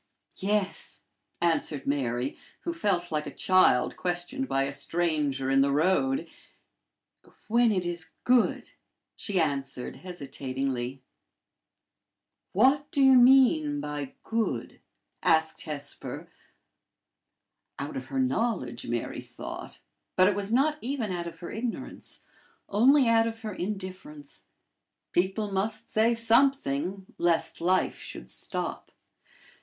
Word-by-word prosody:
"Yes," 200 Hz, 0 st, -2 dB, 0.4 s
answered 165 Hz, -4 st, 0 dB
Mary, 130 Hz, -2 st, -1 dB, 0.3 s
who 340 Hz, -, -3 dB
felt 190 Hz, -, 0 dB
like 150 Hz, -1 st, -1 dB
a -, -, -5 dB
child 185 Hz, -9 st, +3 dB
questioned 180 Hz, +10 st, -3 dB
by 135 Hz, 0 st, +1 dB
a 135 Hz, -, -2 dB
stranger 145 Hz, -3 st, -1 dB
in 135 Hz, 0 st, +5 dB
the 140 Hz, 0 st, +3 dB
road; 190 Hz, -, +2 dB, 0.6 s
" -, -, -29 dB
when 235 Hz, +1 st, +4 dB
it 185 Hz, -3 st, 0 dB
is 170 Hz, -2 st, -4 dB
good," 245 Hz, -1 st, +2 dB, 0.4 s
she 200 Hz, -4 st, -1 dB
added, 135 Hz, -5 st, -2 dB
hesitatingly. 135 Hz, -6 st, -4 dB, 1.5 s
"What 270 Hz, +8 st, +3 dB
do -, -, -3 dB
you 265 Hz, -1 st, +7 dB
mean 270 Hz, +4 st, +6 dB
by 145 Hz, -, -5 dB
good?" 220 Hz, -, -2 dB, 0.4 s
asked 160 Hz, 0 st, +2 dB
Hesper 145 Hz, -2 st, -6 dB, 1.5 s
out 140 Hz, +1 st, -5 dB
of 130 Hz, 0 st, -5 dB
her 135 Hz, -, -4 dB
knowledge, 130 Hz, -, -1 dB
Mary 120 Hz, 0 st, -3 dB
thought, -, -, -8 dB, 0.4 s
but 185 Hz, -, +6 dB
it 205 Hz, -, +3 dB
was 200 Hz, +1 st, -3 dB
not 300 Hz, +5 st, +2 dB
even 245 Hz, -5 st, -2 dB
out 175 Hz, -1 st, -3 dB
of 165 Hz, -, -8 dB
her 170 Hz, -, -6 dB
ignorance, 230 Hz, +2 st, -6 dB, 0.5 s
only 255 Hz, +6 st, +5 dB
out 225 Hz, 0 st, +4 dB
of 225 Hz, 0 st, -6 dB
her 215 Hz, -2 st, -5 dB
indifference. 185 Hz, -7 st, -7 dB, 0.7 s
People 195 Hz, +3 st, 0 dB
must 200 Hz, +3 st, -2 dB
say 225 Hz, +2 st, +3 dB
something, 225 Hz, -, +2 dB
lest 170 Hz, -1 st, +1 dB
life 185 Hz, +2 st, +1 dB
should -, -, -9 dB
stop. -, -, -4 dB
185 Hz, 120 wpm, -28 LUFS, 145-230 Hz, 1.5 s, you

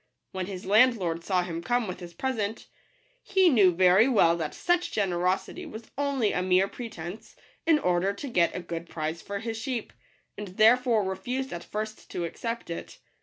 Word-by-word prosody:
When 185 Hz, -1 st, -4 dB
his 190 Hz, -2 st, -7 dB
landlord 200 Hz, -6 st, +3 dB
saw 185 Hz, -1 st, +1 dB
him 170 Hz, -1 st, -5 dB
come 240 Hz, +5 st, 0 dB
with 180 Hz, -, -5 dB
his 175 Hz, -2 st, -10 dB
present, 225 Hz, -2 st, -2 dB, 0.6 s
he 380 Hz, -2 st, +4 dB
knew 205 Hz, -, +5 dB
very 185 Hz, +5 st, +5 dB
well 185 Hz, -10 st, +4 dB
that 160 Hz, -3 st, -4 dB
such 350 Hz, 0 st, +1 dB
generosity 185 Hz, -, -1 dB
was 230 Hz, -6 st, -10 dB
only 275 Hz, -6 st, +1 dB
a 180 Hz, -, 0 dB
mere 185 Hz, +1 st, +3 dB
pretence, 200 Hz, -5 st, -8 dB, 0.3 s
in 325 Hz, -2 st, +6 dB
order 180 Hz, -6 st, +1 dB
to 200 Hz, +8 st, -7 dB
get 175 Hz, -9 st, +2 dB
a 180 Hz, -, -3 dB
good 170 Hz, -1 st, -6 dB
price 160 Hz, +1 st, -4 dB
for 200 Hz, -, -5 dB
his 225 Hz, +1 st, -4 dB
sheep, 230 Hz, 0 st, -4 dB, 0.4 s
and 210 Hz, 0 st, -6 dB
therefore 230 Hz, 0 st, +5 dB
re 190 Hz, -, -2 dB
fused 260 Hz, +6 st, -4 dB
at 170 Hz, -, -6 dB
first 215 Hz, +1 st, -6 dB
to 175 Hz, -, -3 dB
accept 230 Hz, +3 st, -5 dB
it. 170 Hz, -, -7 dB
200 Hz, 180 wpm, -27 LUFS, 175-240 Hz, 0.6 s, in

